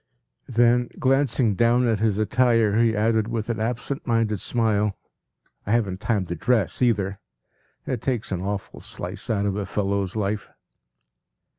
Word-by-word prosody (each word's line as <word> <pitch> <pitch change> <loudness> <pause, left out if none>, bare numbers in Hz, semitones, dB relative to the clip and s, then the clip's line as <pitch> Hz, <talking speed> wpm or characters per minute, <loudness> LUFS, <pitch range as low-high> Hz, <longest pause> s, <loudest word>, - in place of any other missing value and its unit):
” - - -38
Then, 120 -1 +3
glancing 130 -4 +2
down 120 +4 +3
at 115 -3 +1
his 110 -2 +1
attire, 115 -1 +2
he 115 -1 +3
added 110 0 +2
with 115 0 -2
an 110 - -3
absent 120 +5 -3
minded 115 -3 +1
smile, 105 -3 0 0.7
“I 105 - +1
haven’t 100 -5 0
time 105 -5 0
to 85 - -4
dress 115 +4 0
either; 100 -5 +1 0.7
it 125 -4 -3
takes 125 -7 -2
an 90 -2 -2
awful 100 +1 -4
slice 95 +6 -6
out 100 -3 +1
of 100 -1 0
a 100 -2 -3
fellow’s 100 -1 -1
life. 105 0 -2
110 Hz, 155 wpm, -24 LUFS, 100-120 Hz, 0.7 s, Then